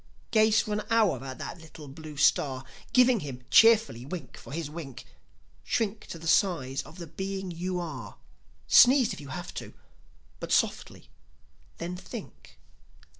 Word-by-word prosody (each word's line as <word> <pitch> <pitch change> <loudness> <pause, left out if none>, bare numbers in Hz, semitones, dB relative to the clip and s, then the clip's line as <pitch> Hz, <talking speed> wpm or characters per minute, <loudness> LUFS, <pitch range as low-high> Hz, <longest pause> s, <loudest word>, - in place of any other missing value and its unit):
Gaze 215 -1 +4
for 210 - -4
an 210 - -1
hour 210 - +2
at 130 -1 -7
that 170 - -7
little 155 -2 -12
blue 155 +1 -10
star, 135 -2 +2 0.3
Giving 250 -2 +5
him, 130 -6 -7
cheerfully, 225 - +5
wink 145 -2 -7
for - - -12
his 160 +1 -3
wink; 145 -5 -8 0.6
Shrink 220 -2 -2
to - - -7
the 165 - -11
size 150 -8 +2
of 160 - -14
the 170 - -7
being 190 +3 -5
you 180 +2 -3
are; 130 -11 -7 0.5
Sneeze 255 -2 +6
if - - -9
you 140 - -10
have 130 - -7
to, - - -8 0.6
but - - -6
softly; - - -1 0.7
then 175 +2 -5
think. 120 - -10
170 Hz, 155 wpm, -28 LUFS, 140-205 Hz, 0.7 s, Sneeze